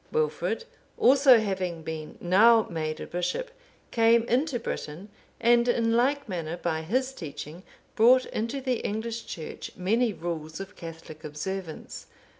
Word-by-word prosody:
Wilfrid 465 0 -1 0.3
also 265 0 +7
having 185 -6 -2
been 155 -1 -6
now 220 +5 +5
made 155 -2 -3
a - - -5
bishop, 180 - -3 0.4
came 230 0 +4
into 250 +3 0
Britain, 180 -3 -6 0.3
and 240 +1 +4
in 230 -1 +2
like 280 +3 +2
manner 170 -3 -4
by 165 -2 -2
his 255 +11 -1
teaching 155 - -8 0.3
brought 245 +3 +6
into 230 +5 -3
the 255 -2 0
English 225 +2 -3
Church 160 - -7
many 220 +6 +2
rules 160 -3 -5
of 195 0 -8
Catholic 165 -2 -10
observance. 160 +3 -6
210 Hz, 135 wpm, -27 LUFS, 165-240 Hz, 0.4 s, also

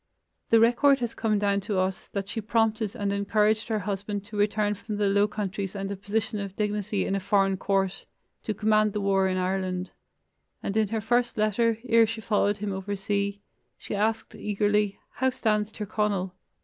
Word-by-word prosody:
The 230 - +6
record 245 +5 +5
has 235 -1 -2
come 215 -2 0
down 200 -1 +2
to 200 0 -3
us 185 0 -1
that 195 -1 -4
she 225 +2 -4
prompted 220 0 0
and 200 -3 -1
encouraged 210 +2 +1
her 220 -2 0
husband 205 0 -3
to 210 0 -10
return 210 0 +1
from 210 +1 -6
the 205 - +1
low 200 +1 +3
countries 200 -2 -4
and 195 0 -3
a - - -2
position 210 +2 -2
of 195 -1 -5
dignity 210 -1 -1
in - - -1
a 195 - +1
foreign 195 0 +2
court 195 0 -1 0.3
to 215 - -3
command 215 0 +2
the 210 - -1
war 195 -1 +2
in 185 0 0
Ireland, 185 0 -1 0.7
and 195 - -2
in 220 -1 +3
her 220 +2 -2
first 240 +2 +1
letter, 215 +2 +2
ere 230 -1 +5
she 225 +1 -4
followed 205 -1 +1
him 205 -1 -3
over 195 +1 -3
sea, 200 +1 -2 0.4
she - - -7
asked 220 +2 0
eagerly: 210 0 0
"How 260 +1 +1
stands 215 -4 0
Tir 215 - -5
Conal?" 200 -3 -1
205 Hz, 190 wpm, -27 LUFS, 195-215 Hz, 0.7 s, The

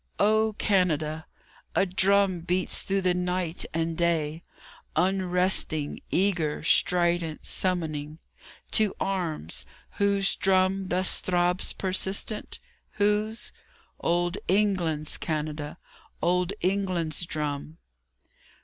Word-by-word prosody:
O 215 +1 +3
Canada! 160 -5 +1 0.5
A - - +4
drum 195 0 +3
beats 180 +2 +1
through 195 0 0
the 180 -1 +2
night 180 -1 -1
and 165 0 -1
day, 165 -2 0 0.5
Unresting, 180 -4 +1
eager, 175 -7 0
strident, 175 -1 +1
summoning 155 -5 -1 0.5
To 215 -3 +3
arms. 160 - -3 0.4
Whose 200 -1 +2
drum 190 0 +2
thus 185 +1 +3
throbs 180 0 +1
persistent? 190 +3 -2 0.4
Whose? 210 +2 0 0.5
Old 175 +1 0
England's, 180 -6 +1
Canada, 150 -1 -3 0.4
Old 180 +1 +1
England's 180 -4 0
drum. 150 0 -4
180 Hz, 90 wpm, -27 LUFS, 160-195 Hz, 0.5 s, A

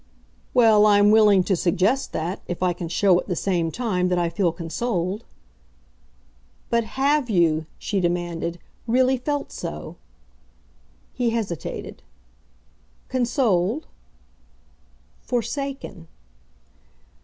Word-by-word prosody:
"Well, 220 -3 +6
I'm 205 0 +5
willing 210 -3 +6
to 190 - +1
suggest 190 +10 +1
that, 175 +5 -3
if 175 +1 -4
I 180 -1 +2
can 170 0 -6
show 180 +1 +3
at - - -7
the 180 - -1
same 170 -3 0
time 185 -3 -1
that 180 0 0
I 170 -1 +1
feel 170 +1 +1
consoled." 185 +4 -3 1.5
"But 235 0 +3
HAVE 280 -1 +2
you," 160 -5 +2
she 200 - -2
demanded, 175 -1 -2 0.3
"really 255 +3 +3
felt 290 +3 -3
so?" 75 0 -7 1.2
He 245 -1 0
hesitated. 215 -8 -4 1.1
"Consoled?" 240 - +1 1.4
"Forsaken." 260 - -4
200 Hz, 105 wpm, -23 LUFS, 175-240 Hz, 1.5 s, Well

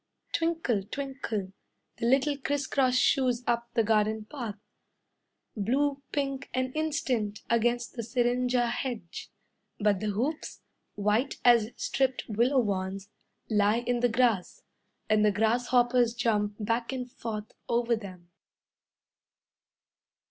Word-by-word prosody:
Twinkle, 330 -10 +1
twinkle, 225 -4 -4 0.4
the 230 - -1
little 275 +3 +3
criss 285 0 -2
cross 255 -2 +2
shoes 250 -1 +2
Up 235 0 0
the 230 - +4
garden 215 0 +1
path. 230 -5 -6 1.0
Blue 275 +7 0
pink 275 -1 -2
an 255 0 0
instant, 255 -9 -1
against 240 +1 +1
the 235 - -4
syringa 245 +1 +1
hedge. 235 -6 -4 0.5
But 205 -3 +2
the 215 - -2
hoops, 255 +10 -3 0.3
white 210 +6 +1
as 235 -3 +6
stripped 265 -1 0
willow 235 +5 +2
wands, 195 -1 -3 0.4
Lie 210 +1 +2
in 245 0 +1
the 245 0 +3
grass, 230 -5 +1 0.4
And 215 -1 +3
the 210 - +5
grasshoppers 240 +2 +2
jump 210 -4 0
back 230 +3 -1
and 255 -2 -4
forth 215 -3 -6 0.2
Over 235 0 +2
them. 185 -5 -10
235 Hz, 120 wpm, -29 LUFS, 215-255 Hz, 1.0 s, as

